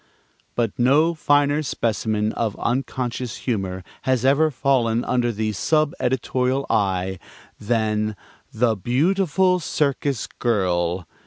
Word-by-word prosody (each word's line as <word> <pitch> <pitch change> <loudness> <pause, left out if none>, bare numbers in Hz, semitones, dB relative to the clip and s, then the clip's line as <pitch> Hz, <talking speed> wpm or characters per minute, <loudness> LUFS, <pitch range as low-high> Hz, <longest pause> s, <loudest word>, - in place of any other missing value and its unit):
But 115 -2 -1
no 145 +7 +4
finer 145 -1 +2
specimen 110 -5 -1
of 110 -3 -2
unconscious 125 -1 -2
humor 95 -6 -2 0.2
has 130 -2 0
ever 145 +4 +4
fallen 120 -4 +1
under 120 -1 +1
the 110 0 -2
sub 155 +8 +1
editorial 130 +1 0
eye 95 -3 0 0.4
than 110 -1 0 0.4
"The 115 0 +1
Beautiful 180 - +2
Circus 140 -5 -1
Girl." 90 -6 -1
120 Hz, 105 wpm, -22 LUFS, 110-140 Hz, 0.4 s, no